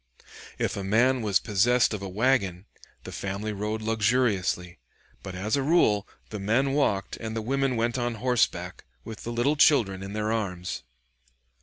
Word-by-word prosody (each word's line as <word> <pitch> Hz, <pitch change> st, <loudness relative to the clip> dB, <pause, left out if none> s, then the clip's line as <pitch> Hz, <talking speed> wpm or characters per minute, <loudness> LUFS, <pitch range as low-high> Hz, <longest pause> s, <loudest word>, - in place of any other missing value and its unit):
If -, -, -1 dB
a 100 Hz, -, -4 dB
man 120 Hz, +6 st, +3 dB
was 105 Hz, -3 st, +2 dB
possessed 115 Hz, +4 st, +2 dB
of 105 Hz, -, -4 dB
a 100 Hz, -, -5 dB
wagon, 100 Hz, -4 st, +1 dB, 0.4 s
the -, -, -8 dB
family 100 Hz, +2 st, -4 dB
rode 105 Hz, +2 st, -3 dB
luxuriously; 105 Hz, -, 0 dB, 0.4 s
but 95 Hz, -2 st, -7 dB
as 100 Hz, +6 st, -1 dB
a 140 Hz, -, 0 dB
rule 135 Hz, -9 st, +3 dB, 0.2 s
the 105 Hz, -, -5 dB
men 120 Hz, +7 st, +1 dB
walked 100 Hz, -9 st, 0 dB
and 110 Hz, -1 st, -5 dB
the 115 Hz, -, -2 dB
women 135 Hz, +2 st, 0 dB
went 120 Hz, +2 st, 0 dB
on 120 Hz, -1 st, -1 dB
horseback 105 Hz, -7 st, 0 dB, 0.2 s
with 110 Hz, -, -9 dB
the 120 Hz, -, -4 dB
little 120 Hz, +6 st, +1 dB
children 115 Hz, -11 st, +4 dB
in 100 Hz, +1 st, -7 dB
their 105 Hz, 0 st, -1 dB
arms. 90 Hz, -, -3 dB
110 Hz, 165 wpm, -26 LUFS, 100-125 Hz, 0.4 s, children